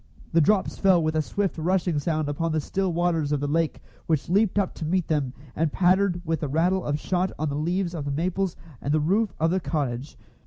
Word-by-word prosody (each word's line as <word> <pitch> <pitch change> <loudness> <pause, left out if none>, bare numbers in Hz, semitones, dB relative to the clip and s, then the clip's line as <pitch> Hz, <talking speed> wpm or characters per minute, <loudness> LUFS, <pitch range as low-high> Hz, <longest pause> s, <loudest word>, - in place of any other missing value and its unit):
The 165 - +5
drops 195 +4 +2
fell 185 -4 +4
with 155 0 0
a 155 - +3
swift 195 +2 -2
rushing 175 -1 +1
sound 155 0 -1
upon 160 +3 -1
the 160 - +2
still 190 +5 -1
waters 165 -3 0
of 145 - +1
the 145 - -2
lake, 160 +2 0 0.2
which 160 -1 0
leaped 205 +2 +2
up 200 -3 +1
to - - -7
meet 180 +2 0
them, 145 -5 0 0.2
and 160 -1 +1
pattered 180 0 +2
with 160 -1 0
the 150 - -2
rattle 175 +6 +1
of 145 0 -1
shot 185 +3 0
on 155 0 -1
the 140 - -3
leaves 175 +4 -1
of 155 -4 -4
the 145 - -2
maples 180 +4 -1 0.3
and 145 +2 0
the - - +3
roof 200 +8 +1
of 160 +1 +2
the 190 - +2
cottage. 140 -5 -3
165 Hz, 230 wpm, -25 LUFS, 150-185 Hz, 0.3 s, The